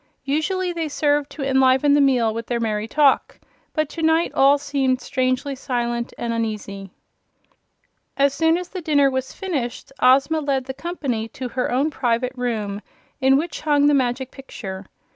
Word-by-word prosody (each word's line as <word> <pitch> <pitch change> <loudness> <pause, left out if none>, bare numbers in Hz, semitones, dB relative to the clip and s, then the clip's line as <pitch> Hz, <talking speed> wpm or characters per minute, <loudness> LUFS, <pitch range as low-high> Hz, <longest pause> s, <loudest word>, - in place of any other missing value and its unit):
Usually 350 +6 -1
they 330 -2 -3
served 290 -1 +1
to 295 - -6
enliven 265 +1 +4
the 290 - +5
meal 245 -5 +3
with 230 0 -5
their 240 -1 -1
merry 215 -1 -1
talk, 285 +2 +2 0.3
but 310 -2 0
to 330 - -6
night 320 +1 +2
all 275 +1 +5
seemed 275 -3 0
strangely 255 +2 -1
silent 240 -3 -2
and 235 -1 -2
uneasy. 210 -4 -4 1.3
As 280 0 +3
soon 325 +2 +2
as 360 0 -6
the 370 - -6
dinner 285 -4 +3
was 260 0 -3
finished 285 -14 -4
Ozma 270 +5 +4
led 275 -3 -1
the 265 - -5
company 275 -7 -3
to 250 +2 -6
her 250 0 -2
own 275 +5 +1
private 250 -1 0
room 215 -5 -3 0.4
in 265 0 +4
which 320 +1 -3
hung 290 -2 +3
the 295 - +5
Magic 260 -1 0
Picture. 195 -8 -8
265 Hz, 165 wpm, -22 LUFS, 240-295 Hz, 1.3 s, the